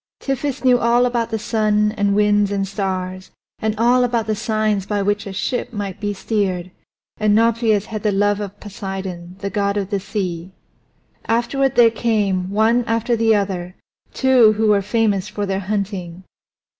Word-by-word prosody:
Tiphys 275 0 -3
knew 250 -1 +5
all 240 +1 +3
about 240 -2 -1
the 220 - -1
sun 210 -1 +1
and 205 -2 0
winds 205 -1 +3
and 195 -1 -1
stars, 185 -1 -4 0.3
and 220 0 -1
all 245 +3 +4
about 235 -2 0
the 220 - 0
signs 215 -2 -1
by 205 -1 -1
which 205 +1 -1
a - - -5
ship 225 +7 -3
might 200 -3 -5
be 205 -1 -2
steered, 190 -3 -2 0.5
and 210 -1 +2
Nauplius 225 -2 +2
had 215 -2 -5
the 210 - +1
love 205 +1 +1
of 205 0 -7
Poseidon, 190 -3 -6
the 200 - -3
god 200 +1 0
of 200 0 -3
the 200 - 0
sea. 185 -3 -4 0.7
Afterward 260 +4 +1
there 235 -2 +6
came, 205 -5 0
one 220 +4 +2
after 230 +1 0
the 225 -1 +3
other, 185 -3 -2 0.4
two 255 -5 +4
who 215 0 +1
were 205 -1 +4
famous 205 -2 0
for 210 -1 -3
their 195 -1 -1
hunting. 190 -3 -4
210 Hz, 170 wpm, -20 LUFS, 195-225 Hz, 0.7 s, there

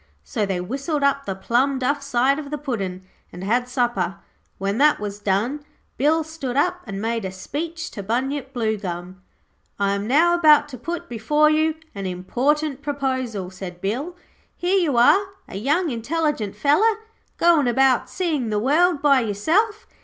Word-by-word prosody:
So 205 - -2
they 190 -2 -1
whistled 275 - -2
up 280 0 +1
the 195 - -2
plum 245 +8 +1
duff 280 +3 0
side 275 +1 +1
of 290 -2 -7
the 300 - -3
Puddin', 195 -10 -4 0.3
and 180 - -8
had 240 +5 +1
supper. 240 -7 0 0.4
When 200 +4 -2
that 300 +1 +5
was 205 -1 -5
done, 210 +9 -1 0.3
Bill 315 +4 +2
stood 290 -5 -5
up 360 +4 +1
and 195 -1 -5
made 225 +1 -2
a 190 - -3
speech 320 - -5
to 200 - -6
Bunyip 265 +6 -2
Bluegum. 190 -6 -3 0.6
'I 200 0 +1
am 200 +1 -3
now 320 +7 +4
about 305 -4 +5
to 255 - -8
put 335 +7 -5
before 295 +7 +2
you 310 0 +2 0.2
an 195 -2 -4
important 265 +11 -1
proposal,' 260 -9 -2
said 180 -1 -8
Bill. 260 - -3 0.4
'Here 365 +3 +1
you 300 -9 +1
are, 310 +12 +6 0.2
a - - -7
young 300 - +1
intelligent 245 -3 -1
feller, 390 - +3 0.4
goin' 335 -6 +4
about 260 0 +3
seein' 300 -6 -1
the 210 - 0
world 300 +7 +2
by 280 -2 +5
yourself. 330 - 0
260 Hz, 165 wpm, -22 LUFS, 205-300 Hz, 0.6 s, are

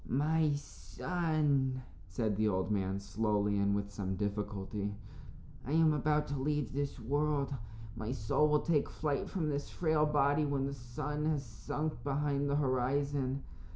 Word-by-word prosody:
"My 155 +3 +2
son," 145 -4 0 0.2
said 105 +2 -1
the 110 +2 +2
old 95 0 0
man, 95 -1 0
slowly, 105 0 +1
and 100 0 +2
with 100 0 -2
some 95 -2 -3
difficulty, 100 0 -2 0.7
"I 140 - -3
am 160 -1 +5
about 150 +1 +2
to 145 -1 -2
leave 145 -3 0
this 140 -1 -2
world. 140 +3 0 0.4
My 110 +1 -3
soul 140 +3 +2
will 150 0 +4
take 155 -4 +2
flight 150 -3 -1
from 165 -6 -1
this 145 -1 -2
frail 155 -3 +2
body 145 0 +3
when 140 -2 0
the 140 - -2
sun 145 +4 -4
has 150 -3 0
sunk 155 +5 -4
behind 140 0 0
the 140 - +2
horizon. 135 0 +1
140 Hz, 155 wpm, -34 LUFS, 110-150 Hz, 0.7 s, am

